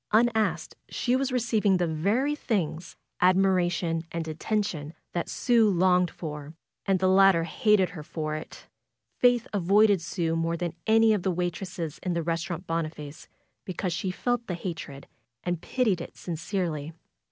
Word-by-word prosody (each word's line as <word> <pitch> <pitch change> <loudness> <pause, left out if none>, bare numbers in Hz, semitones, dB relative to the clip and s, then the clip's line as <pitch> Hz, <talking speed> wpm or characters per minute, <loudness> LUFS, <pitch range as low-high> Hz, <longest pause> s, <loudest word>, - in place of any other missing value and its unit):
Unasked 220 -1 +2 0.2
she 245 0 0
was 265 0 0
receiving 220 -6 +2
the 180 - +1
very 200 - +1
things 175 - -2
— - - -26
admiration 180 -3 +2
and 165 -1 -3
attention 160 -2 -2
— - - -51
that 170 - -2
Sue 230 -3 +3
longed 180 -1 +3
for, 150 -1 -7 0.3
and 195 -1 +3
the 185 +1 +1
later 190 -2 +5
hated 210 0 +2
her 165 -3 -8
for 155 0 -4
it. 155 +1 -8 0.5
Faith 245 -2 +4
avoided 200 0 +4
Sue 170 -1 -1
more 165 +1 0
than 170 -1 -3
any 225 0 +5
of 205 - 0
the 190 - 0
waitresses 175 -2 -3
in 180 - -1
the 170 -1 -1
Restaurant 165 +2 -3
Boniface 155 -3 -4 0.4
because 180 -1 -3
she 190 +2 -2
felt 240 +5 -1
the 180 - -2
hatred 160 -6 -6 0.4
and 175 -2 -2
pitied 215 -8 0
it - - -9
sincerely. 165 -3 -3
180 Hz, 155 wpm, -27 LUFS, 165-210 Hz, 0.5 s, later